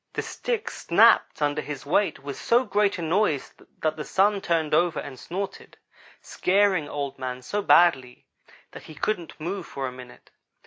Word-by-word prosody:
The - - -3
stick 475 -1 -3
snapped - - +3
under 145 +1 0
his 145 -2 -7
weight 190 +7 +1
with 140 0 -7
so 240 +2 +2
great 205 0 +1
a 170 - -5
noise 165 -4 0 0.3
that 155 0 0
the 150 - -4
Sun 200 +3 +2
turned 165 -4 0
over 170 +2 +2
and 130 -3 -8
snorted, 195 +3 -6 0.4
scaring 190 -4 +1
Old 140 -2 -4
man 130 -1 -5
so 205 +10 -2
badly 135 -10 +3 0.5
that - - -10
he 155 - -10
couldn't 175 +1 -3
move 180 +3 -4
for 135 - -5
a 130 - -4
minute. 125 -1 -14
165 Hz, 170 wpm, -25 LUFS, 140-200 Hz, 0.5 s, snapped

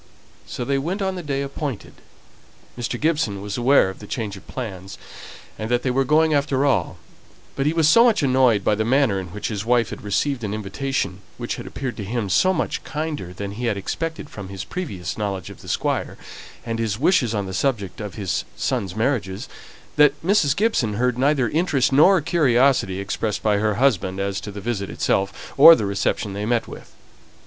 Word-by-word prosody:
So 120 - -5
they 140 +1 +1
went 185 +8 -2
on 190 0 -1
the 180 - -5
day 140 -3 -2
appointed. 140 -3 -5 0.8
Mr. 120 0 -4
Gibson 150 -11 0
was 100 0 -5
aware 125 -1 +4
of 95 - -14
the 105 - -10
change 105 -4 -4
of 95 - -14
plans, 95 -6 -7 0.6
and 110 +1 -4
that 120 0 +1
they 130 - +1
were 135 +2 +2
going 155 +2 +3
after 140 -1 +1
all; 140 - +1 0.6
but 135 +1 0
he 155 - +2
was 165 -2 +3
so 230 +9 +7
much 230 -9 +3
annoyed 130 -6 +3
by 105 - +2
the 110 +1 0
manner 120 -4 +2
in 95 - -6
which 105 +4 -5
his 105 -2 -3
wife 120 0 +2
had - - -7
received 120 +5 -1
an 105 0 -2
invitation 100 -2 -3 0.2
that - - -4
appeared 130 -3 -5
to 105 - -4
him 110 0 -3
so 185 - +4
much 175 - -2
kinder 150 - -4
than 100 +2 -6
he 120 +4 -5
had 110 -4 0
expected 160 - -4
from 100 -8 -9
his 95 -2 -6
previous 110 - -5
knowledge 100 -4 -3
of - - -13
the - - -10
Squire, - - -1 0.5
and 115 -1 -3
his 110 -2 -1
wishes 130 - +2
on 100 -1 -1
the 95 - -6
subject 110 -3 -1
of 105 -2 -6
his 100 -4 -2
sons' 95 -1 -2
marriage, 115 -3 0 0.7
that 150 -1 +5
Mrs. 175 -8 +3
Gibson 175 - +1
heard 125 +2 +1
neither 135 -2 +2
interest 150 -3 +1
nor 175 +6 +6
curiosity 130 - +2
expressed 105 +2 -3
by 105 -1 +3
her 105 0 +1
husband 95 -7 +1
as 100 0 -2
to 105 - -7
the 100 0 -8
visit 100 -3 -3
itself, 100 0 -2
or 165 +4 +10
the 110 - -2
reception 100 0 -1
they 105 +2 -3
met 120 -1 0
with. - - -11
120 Hz, 200 wpm, -22 LUFS, 100-140 Hz, 0.8 s, or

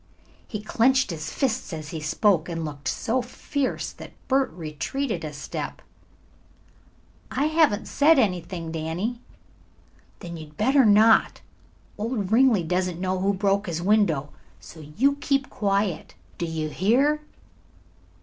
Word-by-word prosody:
He 210 - -5
clenched 260 +2 +2
his 155 -2 -5
fists 255 -6 -1
as 155 -2 -6
he 160 - -5
spoke 170 +2 +1
and 165 -1 -3
looked 145 -2 -7
so 250 +3 0
fierce 260 +2 -3
that - - -12
Bert 270 0 +2
retreated 175 - -4
a 155 - -4
step. 145 -1 -6 1.5
"I 280 - 0
haven't 310 -9 +2
said 315 +3 +4
anything, 180 -6 -1
Danny." 170 +9 -3 1.0
"Then 170 -1 -7
you 155 -1 -9
had 150 0 -21
better 265 +4 +4
not. 215 +2 +5 0.6
Old 215 -3 -2
Ringley 230 -5 +4
doesn't 180 +1 -1
know 185 0 -1
who 195 +2 +2
broke 200 +1 0
his 170 -2 -2
window. 175 -7 +2 0.3
So 90 - -13
you 225 - 0
keep 275 -2 0
quiet; 200 -4 -1 0.2
do 170 - -1
you 160 -1 -3
hear?" 260 - +2
200 Hz, 135 wpm, -25 LUFS, 165-250 Hz, 1.5 s, not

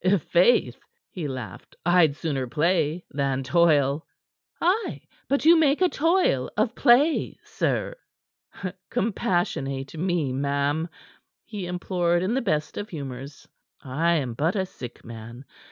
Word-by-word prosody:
"I'faith," 185 +3 +3 0.3
he 170 -5 -4
laughed, 125 -8 -8
"I'd 175 -4 +4
sooner 140 -5 -2
play 160 +4 0
than 135 -2 -1
toil." 150 -1 +2 0.5
"Ay; 380 +6 0 0.3
but 280 +1 +1
you 335 +2 +8
make 295 -2 +3
a 365 -1 +4
toil 330 - +2
of 215 +2 +1
play, 275 +6 +3
sir." - - -2 0.9
"Compassionate 175 - -1
me, 165 -5 -1
ma'am," 140 +4 0 0.6
he 205 -5 -6
implored 175 -1 0
in 195 +5 0
the 265 - +1
best 155 -9 -1
of 205 - -6
humors. 140 -2 -8 0.3
"I 155 +6 0
am 130 -7 -1
but 160 - 0
a 190 -2 0
sick 125 -9 -10
man. 115 +2 -10
165 Hz, 125 wpm, -25 LUFS, 140-200 Hz, 0.9 s, you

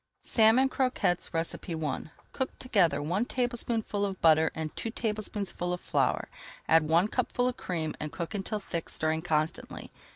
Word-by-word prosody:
SALMON 230 +4 +5
CROQUETTES 255 -10 0
I 165 -1 -2 0.3
Cook 265 - -2
together 195 - +2
one 180 +8 0
tablespoonful 235 -4 -1
of 195 -2 -2
butter 160 -1 +5
and 160 -1 -4
two 225 - -3
tablespoonfuls 210 -5 -2
of - - -11
flour, - - 0 0.4
add 160 -1 +4
one 170 +5 +4
cupful 250 +1 0
of 250 - -1
cream, 160 -9 -3
and 150 0 -4
cook 170 +3 -5
until 210 +1 -2
thick, 170 -4 -4
stirring 160 0 0
constantly. 160 -1 -2
185 Hz, 150 wpm, -29 LUFS, 160-225 Hz, 0.4 s, SALMON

